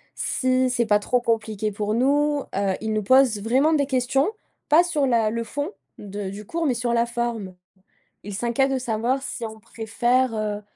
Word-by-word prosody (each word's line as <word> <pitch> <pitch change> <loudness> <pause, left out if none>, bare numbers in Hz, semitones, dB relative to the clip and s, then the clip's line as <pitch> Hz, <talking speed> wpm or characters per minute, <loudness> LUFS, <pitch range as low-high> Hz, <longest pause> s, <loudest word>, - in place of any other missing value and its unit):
si 255 0 +1
c'est 240 -1 +1
pas 210 -1 +5
trop 245 +4 0
compliqué 220 -2 -1
pour 210 +1 -2
nous. 285 +4 +2
Heu, 195 -1 +1
il 220 0 -2
nous 215 -1 0
pose 255 -2 +4
vraiment 265 +8 +2
des 285 -2 +2
questions. 265 +4 +1 0.4
Pas 320 +4 +6
sur 305 -5 0
la 230 -4 +2
le 230 +1 -2
fond 290 - -4 0.3
de 200 -1 -5
du 205 +2 -8
cours 330 +5 -2
mais 260 - +2
sur 240 0 -1
la 235 0 +3
forme. 235 -5 -3 0.7
Il 205 0 -7
s'inquiète 240 +4 +1
de 265 - +1
savoir 245 +3 -1
si 245 - -5
on 220 0 -8
préfère, 240 +3 0
heu, 210 -1 -2
235 Hz, 190 wpm, -23 LUFS, 215-265 Hz, 0.7 s, Pas